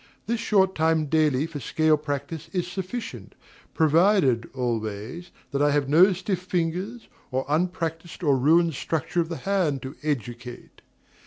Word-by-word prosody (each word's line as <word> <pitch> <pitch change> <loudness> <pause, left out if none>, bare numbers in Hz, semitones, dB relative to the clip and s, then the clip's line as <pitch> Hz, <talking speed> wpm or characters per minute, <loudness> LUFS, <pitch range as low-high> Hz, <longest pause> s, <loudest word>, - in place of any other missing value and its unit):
This 235 0 -1
short 190 -4 +3
time 160 -1 +2
daily 150 -2 +2
for 165 -3 -6
scale 155 +5 +2
practice 150 +2 -5
is 180 -2 0
sufficient, 190 +6 -6 0.4
provided, 160 - +3
always, 120 - -4 0.2
that 140 -1 -1
I 145 - +4
have 145 -1 +1
no 175 +7 +6
stiff 185 0 -2
fingers, 185 +6 -2 0.2
or 130 +1 -1
unpractised 165 +1 -2
or 145 -4 +4
ruined 160 +5 +4
structure 160 +5 -1
of 165 - -4
the 165 - -4
hand 180 -9 0
to 130 +2 -7
educate. 120 -4 -5
160 Hz, 145 wpm, -25 LUFS, 140-180 Hz, 0.4 s, no